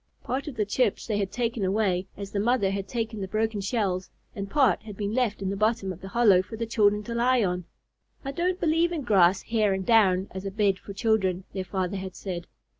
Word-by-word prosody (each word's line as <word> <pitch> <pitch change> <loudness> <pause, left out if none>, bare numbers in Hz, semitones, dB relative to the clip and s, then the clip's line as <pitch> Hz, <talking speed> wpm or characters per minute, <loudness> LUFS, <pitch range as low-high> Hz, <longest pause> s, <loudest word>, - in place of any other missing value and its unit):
Part 265 +3 -3
of 285 - -5
the 210 - 0
chips 210 +1 0
they 210 -3 -1
had 195 -1 -2
taken 235 -2 -1
away, 190 -2 +1
as 200 -1 -7
the 200 - -1
mother 215 -2 +2
had 195 0 -3
taken 225 -2 -3
the 190 - -3
broken 215 +1 -1
shells, 195 -3 -1 0.3
and 200 -1 -5
part 285 0 +3
had 210 -2 -10
been 205 0 -2
left 225 -5 0
in 190 - -1
the - - -2
bottom 215 -2 0
of 180 - -14
the 195 - -7
hollow 205 -4 +5
for 205 +4 -9
the 230 - -2
children 210 -2 +2
to 235 - -5
lie 245 0 +3
on. 180 -2 -1 0.6
"I 275 - -2
don't 355 +5 -1
believe 330 +1 +2
in 320 -4 -3
grass, 190 -5 +4
hair, 215 -3 +1
and 190 -1 -3
down, 195 -4 +4
as 190 0 -6
a 195 - -3
bed 200 -1 +1
for 200 - -9
children," 195 -4 +1
their 190 -1 -3
father 190 +1 -2
had 190 -1 -6
said. 175 -3 -5
205 Hz, 235 wpm, -26 LUFS, 190-230 Hz, 0.6 s, hollow